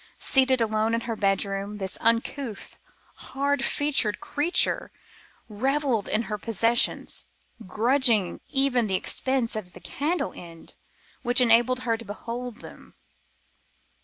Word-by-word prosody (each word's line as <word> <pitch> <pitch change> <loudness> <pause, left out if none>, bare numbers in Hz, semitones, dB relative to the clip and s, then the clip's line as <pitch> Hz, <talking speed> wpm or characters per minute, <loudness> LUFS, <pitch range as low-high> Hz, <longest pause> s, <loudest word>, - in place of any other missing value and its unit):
Seated 260 -2 +2
alone 220 0 +1
in 230 - -2
her 230 -1 -4
bedroom 200 0 -1
this 190 -2 -3
uncouth, 230 0 -1 0.4
hard 280 +2 -2
featured 280 -8 +2
creature 305 +5 +1 0.6
revelled 260 +1 -1
in 220 - 0
her 210 -2 -5
possessions, 230 +3 0 0.4
grudging 230 -3 +2
even 270 -4 +2
the 190 - 0
expense 260 +4 -1
of 185 -5 -6
the - - -12
candle 295 +1 -3
end 165 -2 -11 0.5
which 245 0 +5
enabled 245 +1 +4
her 230 -3 0
to 230 - -10
behold 235 +3 -7
them. - - -14
230 Hz, 120 wpm, -25 LUFS, 210-265 Hz, 0.6 s, which